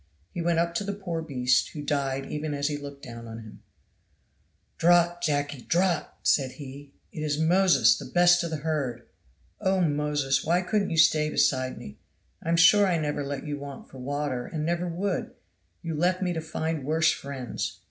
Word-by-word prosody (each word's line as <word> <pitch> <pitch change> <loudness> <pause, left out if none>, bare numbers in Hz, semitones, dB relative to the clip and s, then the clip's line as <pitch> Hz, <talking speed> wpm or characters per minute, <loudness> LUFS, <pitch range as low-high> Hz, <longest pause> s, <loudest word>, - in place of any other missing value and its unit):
He 175 - -3
went 170 0 +1
up 170 0 +1
to 170 - -1
the 200 0 -3
poor 175 -5 -4
beast, 130 -5 +1
who 150 - -6
died 135 -2 -1
even 150 0 -3
as 145 +1 0
he 150 - -2
looked 140 -1 -9
down 115 -1 -9
on 115 0 -7
him. 110 -2 -12 1.2
"Drought, 175 0 +4
Jacky! 145 -4 -1
drought!" 175 +2 +1
said 130 -3 +2
he 140 -1 -10 0.2
"it - - -8
is 150 -1 -1
Moses, 180 +4 +4
the - - -7
best 175 0 +4
of 170 - -3
the 160 - -3
herd. 135 -7 -2 0.5
Oh, 190 0 +1
Moses, 145 -4 +1
why 175 +3 +2
couldn't 200 +2 0
you 165 - -2
stay 155 -1 +4
beside 130 -3 +1
me? 70 - -10 0.4
I'm 165 +1 0
sure 200 +4 +6
I 175 -2 +2
never 150 -2 -2
let 140 -1 -5
you 145 -1 -4
want 140 -1 -9
for 130 - -11
water, 140 -1 -3
and 155 -1 -3
never 175 +1 -1
would 180 +2 -3 0.5
you 165 -1 -3
left 175 +4 +1
me 180 -1 0
to 165 - -3
find 160 -1 -3
worse 160 +3 +3
friends!" 135 -4 -5
155 Hz, 190 wpm, -27 LUFS, 140-170 Hz, 1.2 s, sure